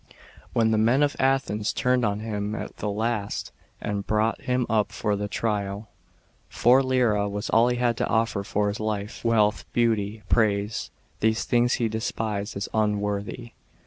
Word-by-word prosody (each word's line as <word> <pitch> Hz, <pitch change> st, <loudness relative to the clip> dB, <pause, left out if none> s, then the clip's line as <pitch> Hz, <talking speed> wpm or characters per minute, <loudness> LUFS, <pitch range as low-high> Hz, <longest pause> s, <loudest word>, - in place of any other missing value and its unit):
When 110 Hz, -1 st, +3 dB
the 110 Hz, -, +2 dB
men 120 Hz, +6 st, +4 dB
of 145 Hz, 0 st, +1 dB
Athens 130 Hz, -6 st, +1 dB
turned 125 Hz, -2 st, +1 dB
on 105 Hz, -1 st, 0 dB
him 105 Hz, -1 st, -3 dB
at -, -, -6 dB
the 105 Hz, -, -2 dB
last, 105 Hz, 0 st, -2 dB, 0.3 s
and 100 Hz, -1 st, -3 dB
brought 110 Hz, +1 st, +1 dB
him 125 Hz, -1 st, 0 dB
up 110 Hz, -1 st, +1 dB
for 105 Hz, -2 st, -1 dB
trial, 100 Hz, 0 st, -2 dB, 0.6 s
4 125 Hz, +3 st, +4 dB, 0.5 s
was 105 Hz, +2 st, -4 dB
all 115 Hz, +1 st, +5 dB
he 125 Hz, 0 st, 0 dB
had 120 Hz, -2 st, +1 dB
to -, -, 0 dB
offer 110 Hz, -3 st, 0 dB
for 105 Hz, +1 st, 0 dB
his 100 Hz, -, -4 dB
life. 105 Hz, -1 st, -3 dB
Wealth, 110 Hz, -2 st, +2 dB
beauty, 110 Hz, -2 st, 0 dB
prai>e, 105 Hz, -1 st, +1 dB, 0.3 s
these 110 Hz, +1 st, +1 dB
things 120 Hz, +1 st, +2 dB
he 120 Hz, -, 0 dB
despised 110 Hz, -2 st, -3 dB
as 100 Hz, -, -3 dB
unworthy. 105 Hz, +2 st, -1 dB
110 Hz, 155 wpm, -25 LUFS, 105-115 Hz, 0.6 s, all